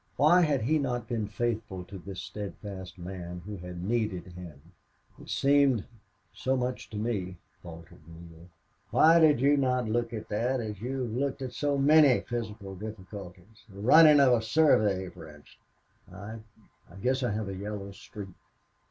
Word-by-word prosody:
Why 175 +5 +5
had 145 -8 +1
he 155 +7 +2
not 125 -5 -2
been 110 -3 -2
faithful 110 -4 -3
to 95 +1 -10
this 95 +1 -8
steadfast 95 0 -8
man 90 -1 -7
who 105 0 -6
had 90 -1 -8
needed 105 -4 -2
him! 85 -5 -10 0.6
"It - - -13
seemed 140 -5 +3 0.5
so 130 +1 -1
much 125 0 -3
to 110 - -7
me," 100 -5 -3 0.2
faltered 85 -2 -12
Neale. 85 0 -13 0.4
"Why 165 - +6
did 155 -6 +5
you 140 +3 +4
not 125 -3 +1
look 115 +1 -1
at 110 -2 -6
that 125 +5 0
as 105 -4 -5
you 130 +2 -3
have 120 - -4
looked 135 +3 -2
at 125 -2 -6
so 145 -1 0
many 145 -1 +5
physical 110 -4 -6
difficulties 100 0 -10
the 100 0 -12
running 150 +7 +7
of 135 -3 +6
a 115 - +2
survey, 110 -7 +3
for 80 - -12
instance?" 75 -1 -16 0.6
"I 100 +5 -8 0.5
I - - -14
guess 130 +5 0
I 125 - 0
have 105 -1 -3
a 100 - -4
yellow 100 0 -6
streak." 100 0 -10
110 Hz, 170 wpm, -28 LUFS, 95-130 Hz, 0.6 s, running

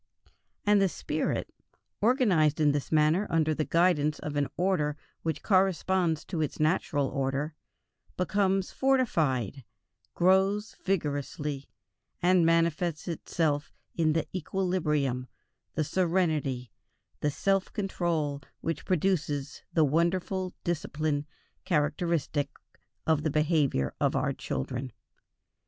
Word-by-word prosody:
And 205 -1 +5
the 195 - +3
spirit, - - -2 0.5
organized 200 - +3
in 150 -2 +4
this 145 -1 -2
manner 155 +6 +3
under 155 -1 +2
the 155 - 0
guidance 165 -4 +2
of 150 -1 -5
an 145 -1 +1
order 170 -5 +1 0.2
which 160 -3 -3
corresponds 185 -4 +2
to 170 -4 -3
its 150 - -2
natural 155 -2 +1
order, 140 +3 -1 0.6
becomes 195 +1 +1
fortified, 155 - +1 0.5
grows 190 +4 +3
vigorously, 145 -5 -2 0.5
and 180 0 +4
manifests 165 0 +1
itself 155 -3 -1 0.2
in 160 -2 +2
the 160 - 0
equilibrium, 150 -8 0 0.5
the 155 - +1
serenity, 155 -8 0 0.5
the 150 - +1
self 195 +6 0
control 165 -7 -1 0.2
which 165 - -3
produce 155 -6 0
the 160 -2 +4
wonderful 180 +5 0
discipline 155 -3 -1 0.4
characteristic 155 -3 0 0.6
of 160 -2 +2
the 155 - 0
behavior 150 - +1
of - - +2
our - - +1
children. 125 - -4
160 Hz, 110 wpm, -29 LUFS, 145-185 Hz, 0.6 s, And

